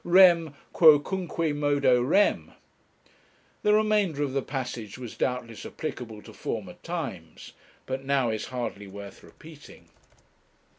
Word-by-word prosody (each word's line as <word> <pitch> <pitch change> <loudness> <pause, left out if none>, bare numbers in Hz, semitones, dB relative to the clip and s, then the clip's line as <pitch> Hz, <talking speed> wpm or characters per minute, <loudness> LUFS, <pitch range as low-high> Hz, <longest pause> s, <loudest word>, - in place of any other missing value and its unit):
Rem..., 175 -4 +5 0.2
quocunque 165 0 +3
modo 145 -4 +3
rem! 170 +11 +2 1.1
The 210 0 +4
remainder 210 -8 +2
of 135 -2 -3
the 135 - +1
passage 120 -6 -5
was 125 -3 -8
doubtless 125 -3 -3
applicable 115 -8 -6
to - - -13
former - - -5
times, - - -6 0.3
but 130 +1 -4
now 135 -4 +1
is 110 -1 -3
hardly 120 -5 -5
worth 100 +1 -10
repeating. 155 -2 -15
140 Hz, 115 wpm, -27 LUFS, 120-165 Hz, 1.1 s, Rem